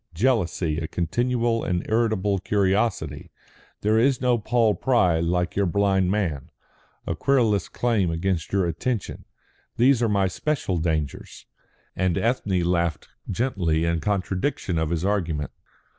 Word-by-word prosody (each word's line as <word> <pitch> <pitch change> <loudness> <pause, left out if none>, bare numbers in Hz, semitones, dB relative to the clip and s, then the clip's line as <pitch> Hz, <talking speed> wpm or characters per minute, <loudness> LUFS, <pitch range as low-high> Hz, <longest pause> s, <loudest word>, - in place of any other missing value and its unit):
Jealousy, 90 -7 +1
a 80 - -4
continual 115 +6 0
and 90 -1 -1
irritable 110 -3 +1
curiosity 95 -6 0 0.5
there 110 +2 +3
is 130 +1 +3
no 125 -2 +2
Paul 110 0 +2
Pry 90 -6 +2
like 90 +1 -1
your 100 -1 +2
blind 95 0 +2
man 90 - -1 0.6
a - - -1
querulous 115 -8 +1
claim 115 -7 0
upon 85 +2 0
your 100 -2 +2
attention 100 +7 -3 0.5
these 125 +1 +4
are 115 - +2
my 100 -2 +2
special 95 - -2
dangers." 80 -4 -3 0.5
And 90 -2 0
Ethne 105 -6 0
laughed 85 -2 -1 0.2
gently 90 -8 0
in 85 0 0
contradiction 95 - -1
of 80 -1 -1
his 85 +1 -1
argument. 85 -8 -1
95 Hz, 130 wpm, -24 LUFS, 85-115 Hz, 0.6 s, these